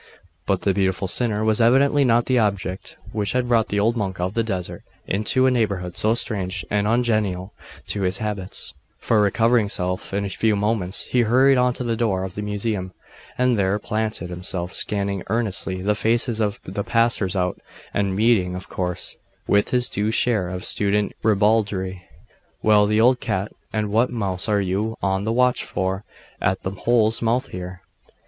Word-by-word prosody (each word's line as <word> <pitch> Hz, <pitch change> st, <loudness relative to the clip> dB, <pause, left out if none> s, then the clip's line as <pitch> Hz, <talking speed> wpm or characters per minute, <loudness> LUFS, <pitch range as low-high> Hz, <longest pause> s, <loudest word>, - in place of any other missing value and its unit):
But 95 Hz, -2 st, +1 dB
the 100 Hz, -, +2 dB
beautiful 95 Hz, -1 st, 0 dB
sinner 110 Hz, +1 st, 0 dB
was 110 Hz, +1 st, +2 dB
evidently 140 Hz, +5 st, +4 dB
not 120 Hz, -2 st, +3 dB
the 130 Hz, -1 st, +2 dB
object 100 Hz, -3 st, -2 dB
which 105 Hz, -2 st, -1 dB
had 125 Hz, -1 st, 0 dB
brought 115 Hz, -2 st, +3 dB
the 105 Hz, -, -1 dB
old 115 Hz, +3 st, +2 dB
monk 95 Hz, -5 st, -3 dB
of 90 Hz, +2 st, -1 dB
the 115 Hz, -, +1 dB
desert 95 Hz, -5 st, -3 dB, 0.2 s
into 110 Hz, +6 st, +2 dB
a 130 Hz, -, +4 dB
neighbourhood 100 Hz, -7 st, -1 dB
so 110 Hz, +2 st, +3 dB
strange 95 Hz, -5 st, -2 dB
and 105 Hz, 0 st, +1 dB
ungenial 110 Hz, -5 st, 0 dB, 0.4 s
to 100 Hz, -, -2 dB
his 95 Hz, 0 st, 0 dB
habits; 105 Hz, -3 st, -4 dB, 0.2 s
for, 110 Hz, -2 st, +2 dB
recovering 115 Hz, +3 st, +3 dB
himself 90 Hz, -2 st, -2 dB
in 100 Hz, +1 st, -1 dB
a -, -, -3 dB
few 110 Hz, +2 st, +1 dB
moments, 100 Hz, -2 st, -1 dB
he 125 Hz, -, +1 dB
hurried 130 Hz, +4 st, +4 dB
on 125 Hz, 0 st, +3 dB
to -, -, -3 dB
the 115 Hz, -1 st, -1 dB
door 105 Hz, -5 st, 0 dB
of 95 Hz, -2 st, -5 dB
the 105 Hz, -, -5 dB
Museum, 105 Hz, -2 st, -3 dB, 0.4 s
and 125 Hz, -3 st, +2 dB
there 95 Hz, +1 st, +2 dB
planted 110 Hz, -4 st, -3 dB
himself, 90 Hz, 0 st, -4 dB
scanning 100 Hz, -2 st, -2 dB
earnestly 95 Hz, -4 st, -1 dB
the 105 Hz, +2 st, +2 dB
faces 115 Hz, +2 st, +1 dB
of 105 Hz, -2 st, -1 dB
the 100 Hz, +2 st, -4 dB
passers 115 Hz, -5 st, +1 dB
out, 90 Hz, -1 st, -1 dB, 0.3 s
and 100 Hz, -2 st, 0 dB
meeting, 100 Hz, -4 st, +2 dB
of 90 Hz, -, -7 dB
course, 90 Hz, -2 st, -2 dB, 0.3 s
with 100 Hz, 0 st, +2 dB
his 125 Hz, -1 st, +2 dB
due 105 Hz, +2 st, -1 dB
share 110 Hz, -5 st, +1 dB
of 90 Hz, 0 st, -4 dB
student 105 Hz, 0 st, +1 dB
ribaldry. 100 Hz, -3 st, +1 dB, 0.6 s
'Well, 105 Hz, -1 st, +4 dB
old 125 Hz, +2 st, +4 dB
cat, 95 Hz, +2 st, -2 dB, 0.2 s
and 105 Hz, -1 st, -2 dB
what 115 Hz, +4 st, +3 dB
mouse 100 Hz, -4 st, -2 dB
are 105 Hz, -1 st, +2 dB
you 100 Hz, +4 st, -2 dB
on 95 Hz, 0 st, 0 dB
the 110 Hz, -, 0 dB
watch 125 Hz, +1 st, +2 dB
for, 95 Hz, +2 st, -2 dB, 0.4 s
at 95 Hz, 0 st, 0 dB
the 95 Hz, -, -2 dB
hole's 110 Hz, +2 st, +1 dB
mouth 120 Hz, +3 st, 0 dB
here? 90 Hz, 0 st, -7 dB
105 Hz, 180 wpm, -22 LUFS, 95-115 Hz, 0.6 s, evidently